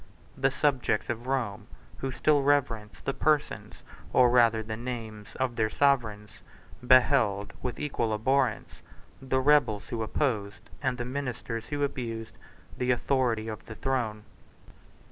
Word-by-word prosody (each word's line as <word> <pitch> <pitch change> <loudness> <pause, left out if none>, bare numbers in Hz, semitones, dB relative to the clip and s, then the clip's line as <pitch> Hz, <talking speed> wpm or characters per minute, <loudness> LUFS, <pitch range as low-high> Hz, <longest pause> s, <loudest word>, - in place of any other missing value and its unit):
The 135 0 +2
subjects 135 -6 0
of 120 +1 -6
Rome, 125 -7 -2 0.3
who 135 - -3
still 145 +2 +2
reverenced 125 -7 0
the 135 - 0
persons, 150 0 -1 0.3
or 125 -1 +5
rather 115 -2 +4
the 110 0 -5
names, 115 -3 -7
of 130 -2 -1
their 110 -1 +2
sovereigns, 110 -6 +1 0.6
beheld, 120 -6 +4
with 125 - -4
equal 135 -6 -1
abhorrence, 125 +2 0 0.4
the 130 0 0
rebels 130 -7 +3
who 115 - -3
opposed, 110 -3 -2
and 130 -3 0
the 120 - -3
ministers 125 -3 -4
who 145 -1 -2
abused, 115 -5 -4 0.4
the 125 - -2
authority 120 -3 +1
of 110 -1 -7
the 110 - -8
throne. 120 -5 -2
125 Hz, 135 wpm, -28 LUFS, 110-135 Hz, 0.6 s, or